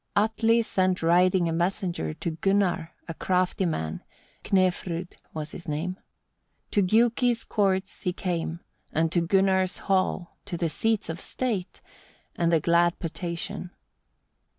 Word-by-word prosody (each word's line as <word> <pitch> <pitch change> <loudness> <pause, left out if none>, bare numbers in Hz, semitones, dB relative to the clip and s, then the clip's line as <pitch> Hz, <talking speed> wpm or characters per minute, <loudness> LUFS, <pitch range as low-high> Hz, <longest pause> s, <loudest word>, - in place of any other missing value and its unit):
1. 205 - +5
Atli 225 +1 +2
sent 185 -4 0
riding 180 +1 +4
a - - 0
messenger 175 - -1
to 170 - -3
Gunnar, 175 -1 +1 0.2
a 165 - -4
crafty 185 +2 +1
man, 80 - -3 0.4
Knefrud 180 -2 0 0.2
was 155 -1 -5
his 175 - -9
name. 165 +5 -3 0.7
To 205 - +3
Giuki's 235 +4 +3
courts 195 -2 0
he 180 - 0
came, 170 -2 -3 0.3
and 160 +1 +1
to 175 - +2
Gunnar's 190 +1 +2
hall, 185 -2 0
to 175 - -4
the 165 -1 0
seats 220 +6 0
of 165 +2 -4
state, 220 -8 -3 0.5
and 170 -1 +1
the 165 - +4
glad 170 +2 +3
potation: 170 +1 -4
2. - - -10
180 Hz, 140 wpm, -27 LUFS, 170-195 Hz, 0.7 s, 1